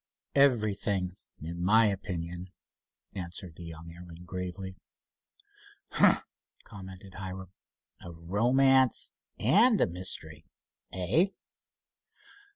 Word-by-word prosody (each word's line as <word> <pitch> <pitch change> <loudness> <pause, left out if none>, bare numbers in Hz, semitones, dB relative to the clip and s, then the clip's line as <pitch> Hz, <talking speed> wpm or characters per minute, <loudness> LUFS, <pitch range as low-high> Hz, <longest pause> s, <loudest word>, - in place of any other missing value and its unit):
"Everything, 105 -8 +2 0.2
in 85 +3 -5
my 110 +5 +6
opinion," 90 -3 -3 0.6
answered 90 -2 -6
the 85 - -9
young 85 0 -9
airman, 85 0 -11
gravely. 90 +1 -5 1.2
"Humph!" - - +5 0.4
commented 95 -1 -11
Hiram. 95 -1 -6 0.5
"A 85 - -8
romance 125 +10 +3 0.3
and 210 - +5
a - - +5
mystery, 80 -3 -5 0.4
eh?" 95 - +2
95 Hz, 85 wpm, -30 LUFS, 85-105 Hz, 1.2 s, my